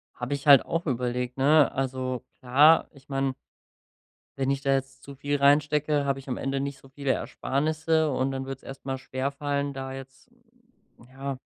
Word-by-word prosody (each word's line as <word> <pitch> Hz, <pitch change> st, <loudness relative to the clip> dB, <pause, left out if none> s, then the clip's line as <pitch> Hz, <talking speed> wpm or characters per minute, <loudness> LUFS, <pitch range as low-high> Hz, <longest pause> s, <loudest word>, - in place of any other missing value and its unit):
Hab 125 Hz, -, -5 dB
ich 140 Hz, +1 st, -3 dB
halt 140 Hz, -3 st, +8 dB
auch 165 Hz, +1 st, -2 dB
überlegt, 125 Hz, -1 st, -2 dB
ne? 145 Hz, +2 st, +5 dB
Also 130 Hz, -1 st, -3 dB, 0.2 s
klar, 145 Hz, +6 st, +5 dB
ich 135 Hz, -3 st, -19 dB
mein 135 Hz, -1 st, -1 dB, 1.0 s
wenn 135 Hz, 0 st, 0 dB
ich 140 Hz, 0 st, -1 dB
da 135 Hz, 0 st, +2 dB
jetzt 135 Hz, 0 st, -3 dB
zu 140 Hz, -, -10 dB
viel 145 Hz, +2 st, -1 dB
reinstecke, 145 Hz, +1 st, +3 dB
hab 140 Hz, -1 st, 0 dB
ich 135 Hz, 0 st, -11 dB
am 125 Hz, -, -2 dB
Ende 135 Hz, 0 st, -2 dB
nicht 140 Hz, 0 st, -4 dB
so 135 Hz, -, -18 dB
viele 135 Hz, 0 st, -1 dB
Ersparnisse 155 Hz, +3 st, 0 dB
und 130 Hz, 0 st, 0 dB
dann 135 Hz, 0 st, -4 dB
wird's 135 Hz, -1 st, -7 dB
erst 135 Hz, 0 st, -10 dB
mal 135 Hz, -1 st, -3 dB
schwerfallen, 140 Hz, +2 st, -2 dB
da 135 Hz, 0 st, -5 dB
jetzt, 135 Hz, 0 st, -11 dB, 0.8 s
ja 135 Hz, 0 st, -5 dB
135 Hz, 175 wpm, -27 LUFS, 130-145 Hz, 1.0 s, halt